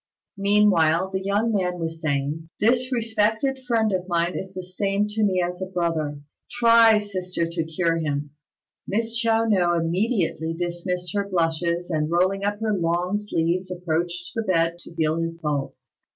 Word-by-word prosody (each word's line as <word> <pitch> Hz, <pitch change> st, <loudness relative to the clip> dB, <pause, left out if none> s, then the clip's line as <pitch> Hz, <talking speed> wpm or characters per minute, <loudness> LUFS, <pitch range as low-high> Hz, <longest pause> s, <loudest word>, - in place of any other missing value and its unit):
Meanwhile 190 Hz, -4 st, +3 dB
the 190 Hz, 0 st, -2 dB
young 205 Hz, +4 st, 0 dB
man 180 Hz, -3 st, 0 dB
was 165 Hz, -1 st, -4 dB
saying, 150 Hz, +1 st, -2 dB
"This 250 Hz, +4 st, +2 dB
respected 225 Hz, +3 st, +1 dB
friend 225 Hz, -3 st, +2 dB
of 185 Hz, -1 st, -2 dB
mine 170 Hz, 0 st, 0 dB
is 190 Hz, -, -5 dB
the 185 Hz, -1 st, -6 dB
same 195 Hz, +2 st, -1 dB
to 215 Hz, +1 st, -1 dB
me 190 Hz, -3 st, +2 dB
as 180 Hz, +1 st, -4 dB
a 190 Hz, -, -2 dB
brother. 165 Hz, -5 st, -2 dB, 0.3 s
Try, 230 Hz, -2 st, +6 dB
sister, 185 Hz, -4 st, -2 dB
to 165 Hz, 0 st, -2 dB
cure 165 Hz, +1 st, 0 dB
him." 145 Hz, -2 st, -2 dB, 0.6 s
Miss 225 Hz, +3 st, -1 dB
Chiao 230 Hz, -1 st, +2 dB
no 185 Hz, -6 st, +3 dB
immediately 170 Hz, -2 st, 0 dB
dismissed 175 Hz, 0 st, -3 dB
her 200 Hz, -1 st, -1 dB
blushes, 170 Hz, 0 st, 0 dB
and 155 Hz, -1 st, 0 dB
rolling 185 Hz, +3 st, +1 dB
up 205 Hz, +1 st, -1 dB
her 220 Hz, -1 st, +1 dB
long 175 Hz, +3 st, 0 dB
sleeves 180 Hz, -2 st, -1 dB
approached 175 Hz, 0 st, -3 dB
the 225 Hz, -, -1 dB
bed 170 Hz, -4 st, +1 dB
to 170 Hz, -, -13 dB
feel 160 Hz, 0 st, +1 dB
his 165 Hz, 0 st, -3 dB
pulse. 135 Hz, -5 st, -4 dB
180 Hz, 165 wpm, -24 LUFS, 165-205 Hz, 0.6 s, Try